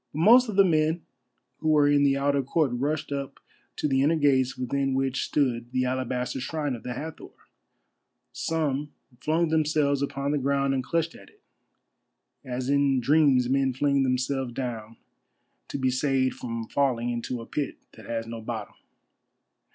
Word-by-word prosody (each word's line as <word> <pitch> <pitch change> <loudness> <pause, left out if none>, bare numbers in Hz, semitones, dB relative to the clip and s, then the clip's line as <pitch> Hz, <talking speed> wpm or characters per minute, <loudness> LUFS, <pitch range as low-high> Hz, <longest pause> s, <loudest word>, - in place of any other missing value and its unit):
But - - -6
most 240 +6 +7
of 210 - -4
the 195 0 +6
men 160 0 +1 0.6
who 155 - 0
were 150 -2 +5
in 145 0 +4
the 140 -1 +3
outer 140 0 +1
court 140 +1 0
rushed 145 +4 -2
up 140 -1 -4 0.4
to - - -1
the 135 -2 +2
inner 150 +4 +3
gates 135 -4 +2
within 135 +1 -1
which 135 -1 0
stood 120 -4 -1
the 130 0 +1
alabaster 125 0 -2
shrine 145 +1 -2
of 115 - -9
the 125 - -5
Hathor. 155 +4 -8 1.0
Some 150 -3 -2 0.3
flung 160 +4 +1
themselves 150 -3 +1
upon 140 0 -2
the 145 - +1
ground 140 0 +1
and 130 -1 -1
clutched 165 +3 -1
at - - -15
it, - - -29 1.0
as 125 0 -4
in 140 -1 +3
dreams 135 -1 +4
men 135 0 +1
fling 140 +1 +2
themselves 130 -1 -1
down 115 -3 -5 0.7
to - - -4
be 130 -1 +1
saved 130 0 +1
from 115 -2 -5
falling 125 -4 0
into 120 +1 -3
a 115 - -8
pit 145 +3 -3
that - - -14
has 115 -1 -3
no 115 0 -7
bottom. 110 -2 -5
135 Hz, 165 wpm, -26 LUFS, 125-145 Hz, 1.0 s, most